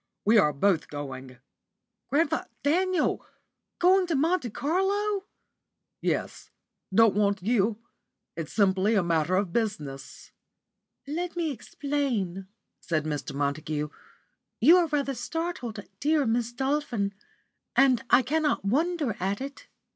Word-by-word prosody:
We 215 +2 +6
are 150 -7 +4
both 160 +4 +1
going." 130 -3 -7 0.7
"Grandf! 315 +4 +1 0.2
Daniel! 360 +3 +1 0.5
Going 370 +1 +4
to 335 - 0
Monte 315 -1 +1
Carlo!" 390 - 0 0.8
"Yes. - - -2 0.4
Don't 225 +1 +5
want 200 -2 +1
you. 215 -1 +2 0.6
It's 165 -2 -5
simply 200 +1 +2
a 195 - +3
matter 170 +1 +1
of 185 -3 0
business." 150 - -4 0.8
"Let 340 +5 -3
me 335 -3 -1
explain," 240 -9 -3 0.3
said 155 -3 -1
Mr. 150 -3 -4
Montague. 150 +1 -2 0.7
"You 320 +10 +7
are 350 -2 +3
rather 285 -3 -1
startled, 255 -4 -4 0.2
dear 300 -1 +2
Miss 230 0 0
Dolphin, 255 -6 -1 0.6
and 265 -2 +4
I 260 - +6
cannot 300 -3 0
wonder 295 - 0
at 195 +2 -1
it." 275 +1 -8
235 Hz, 115 wpm, -27 LUFS, 190-305 Hz, 0.8 s, You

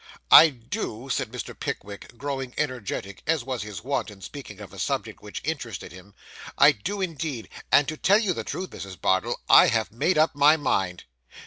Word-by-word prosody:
'I 165 - +10
do,' 125 - -6
said 130 -5 -1
Mr. 125 - -6
Pickwick, 100 +3 -7
growing 135 -1 -4
energetic, 115 -8 -4
as 160 -5 +1
was 130 -2 -4
his 105 -3 -7
wont 135 -2 -2
in 105 -2 -13
speaking 80 - -9
of - - -11
a - - -10
subject - - -3
which 105 - -7
interested 135 - -5
him 95 +2 -14 0.4
'I - - +8
do, 200 - -5
indeed; 160 -9 -4 0.2
and 145 -1 +5
to 155 - -4
tell 200 +5 +4
you 210 -5 +1
the - - -4
truth, 185 - -5
Mrs. 95 -2 -9
Bardell, 95 0 +1
I - - +8
have 110 -1 0
made 155 - 0
up 155 0 +3
my 145 +2 +5
mind. 95 - -1
130 Hz, 190 wpm, -25 LUFS, 105-155 Hz, 0.4 s, I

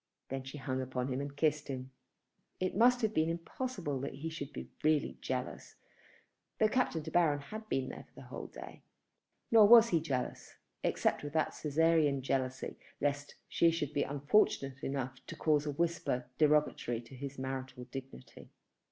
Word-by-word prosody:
Then 135 0 -3
she 135 +3 -8
hung 130 -2 -2
upon 130 0 -2
him 130 +1 -1
and 140 0 -5
kissed 150 0 +1
him. 130 -1 -5 0.7
It 185 -1 -1
must 245 +3 +5
have 220 -1 +2
been 160 -4 +2
impossible 170 - -3
that 135 - -4
he 155 +4 -4
should 150 -3 -6
be - - -8
really 150 - +2
jealous, - - -4 0.8
though 215 - +4
Captain 215 -10 +1
De - - -6
Baron 155 -5 +3
had 215 +8 -8
been 130 -1 0
there - - -9
the - - -11
whole - - -7
day. - - -10 0.7
Nor 220 -3 +8
was 230 +1 +9
he 165 -6 +2
jealous, 135 -5 -3 0.3
except - - +1
with 145 0 -6
that 160 -1 +2
Cæsarian 155 -2 +2
jealousy 130 0 -2 0.2
lest 145 0 -1
she 170 - +4
should 155 -3 -2
be 145 - +1
unfortunate 140 -2 +1
enough 130 -2 -3
to 170 - -6
cause 150 -1 +2
a - - 0
whisper 155 -5 -1
derogatory 150 -6 +2
to 120 +2 -15
his 140 +1 -6
marital 130 -1 -5
dignity. 130 - -10
145 Hz, 170 wpm, -33 LUFS, 130-165 Hz, 0.8 s, was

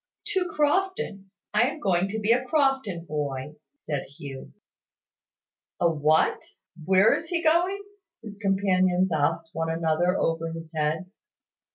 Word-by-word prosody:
"To 375 -2 +1
Crofton. 300 - -1 0.2
I 245 - +4
am 305 - -7
going 185 -7 +1
to 210 +3 -4
be 215 +1 +1
a 245 +2 +3
Crofton 265 - 0
boy," 150 -1 -4 0.2
said 150 - -4 0.2
Hugh. 140 -5 -8 1.3
"A 175 - +4
what? 155 0 +2 0.4
Where 190 +5 +5
is 330 - -5
he 340 0 -1
going?" 355 +5 +2 0.4
his 205 -2 -9
companions 190 -2 +2
asked 160 +2 0
one 165 0 -2
another 165 +2 +1
over 165 0 -1
his 165 -1 -8
head. 160 +4 -1
185 Hz, 135 wpm, -26 LUFS, 160-255 Hz, 1.3 s, Where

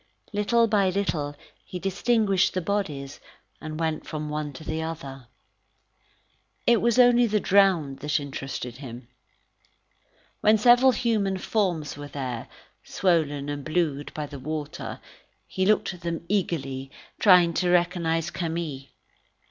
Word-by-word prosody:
Little 230 +3 +3
by 205 -3 +2
little 165 -7 -1 0.3
he 180 - -7
distinguished 195 +1 +1
the - - +2
bodies, 155 -8 -3 0.4
and 155 0 -6
went 160 -1 -2
from 150 -1 -4
one 150 -1 -3
to 145 - -10
the 160 +1 -3
other. 140 -6 -6 1.4
It 235 -1 +4
was 235 0 +2
only 245 -1 +6
the 210 -1 +1
drowned 185 -9 +3
that 150 +2 0
interested 135 -3 -6
him. 125 -3 -9 1.3
When 215 +1 +5
several 245 +4 +6
human 210 -6 0
forms 180 -8 -1
were 145 0 -7
there, 130 -5 -5 0.4
swollen 155 -6 0
and 145 -1 -4
blued 155 -3 -1
by 150 - -3
the 145 -1 -9
water, 155 +3 -5 0.5
he 190 0 -1
looked 210 -2 +2
at 180 - -13
them 170 -1 -4
eagerly, 135 -9 -2 0.3
seeking 180 -4 +6
to 180 +2 0
recognise 170 -2 +1
Camille. 165 -6 -4
165 Hz, 130 wpm, -26 LUFS, 145-195 Hz, 1.4 s, only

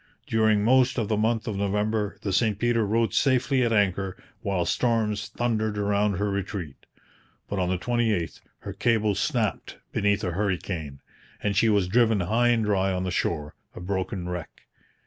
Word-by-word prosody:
During 110 -2 +2
most 130 +3 +4
of 110 -4 -1
the 110 - +2
month 115 +2 0
of 105 -3 -2
November 105 +1 -1
the 100 - -1
St 110 -1 +2
Peter 115 -1 +1
rode 110 -1 +1
safely 130 0 +2
at 120 -2 +2
anchor 95 -3 +1 0.2
while 95 -3 -1
storms 110 +1 0
thundered 110 -2 -1
around 105 0 +1
her 100 +2 -1
retreat; 95 -6 -5 0.6
but 100 - -3
on 90 -1 0
the 95 - 0
28th 110 -6 -1 0.2
her 100 - -6
cable 110 0 +1
snapped 100 +2 -1
beneath 100 0 +1
a 90 - -1
hurricane, 85 -7 -3 0.4
and 100 -1 0
she 110 +3 +4
was 100 -4 +2
driven 110 0 +3
high 110 +7 +2
and 115 -2 +2
dry 95 -2 +1
on 90 0 -1
the 90 - -2
shore, 75 -4 -2 0.2
a - - -7
broken 95 0 -3
wreck. 90 -2 -6
105 Hz, 170 wpm, -26 LUFS, 95-115 Hz, 0.6 s, most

